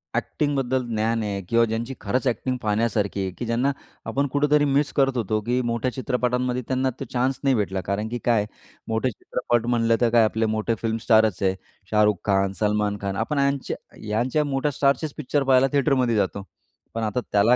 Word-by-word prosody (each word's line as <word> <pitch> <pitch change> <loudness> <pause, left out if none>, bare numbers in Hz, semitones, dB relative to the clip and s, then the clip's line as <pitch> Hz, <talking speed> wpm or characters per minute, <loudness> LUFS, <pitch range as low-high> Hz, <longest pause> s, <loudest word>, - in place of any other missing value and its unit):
ॲकटिन्गबद्दल 135 -3 0
ज्ञान 115 +1 +1
आहे. 100 -2 -3
किंवा 115 0 +4
ज्यांची 115 +4 -3
खरंच 125 +6 -1
ॲकटिन्ग 125 +1 -1
पाहण्यासारखी 105 -2 0
आहे, 95 -1 -2
की 120 - -6
ज्यांना 120 +4 +1 0.3
आपण 140 +1 0
कुठेतरी 145 +1 +3
मिस 140 +1 +1
करत 135 -2 +2
होतो, 110 -2 0
की 125 +4 0
मोठ्या 115 +2 -1
चित्रपटांमध्ये 125 -1 -1
त्यांना 130 0 +1
तो 135 - -4
चान्स 130 +1 0
नाही 135 -2 +3
भेटला, 95 -3 -1
कारण 100 +4 -2
की 120 - -3
काय 120 -2 +4
आहे, - - -8 0.4
मोठे 110 +3 0
चित्रपट 115 +2 -2
म्हटलं 115 -1 +2
तर 120 - +4
काय 115 0 +5
आपले 110 +1 +1
मोठे 110 +1 0
फिल्मस्टारच 110 -2 +2
आहे. 95 0 +2 0.4
शाहरुख 105 -1 +4
खान, 95 -1 +2
सलमान 105 -1 +1
खान 100 -1 -2
आपण 140 +6 -1
यांच 140 -1 0 0.4
यांच्या 120 +8 +1
मोठ्या 140 +1 0
स्टारचेच 140 +2 +1
पिक्चर 145 0 0
पाहायला 130 0 +4
थिएटरमध्ये 130 -4 +2
जातो. 100 -1 0 0.5
पण 115 - -2
आता 110 +3 0
त्याला 105 +4 +5
120 Hz, 180 wpm, -24 LUFS, 110-130 Hz, 0.5 s, काय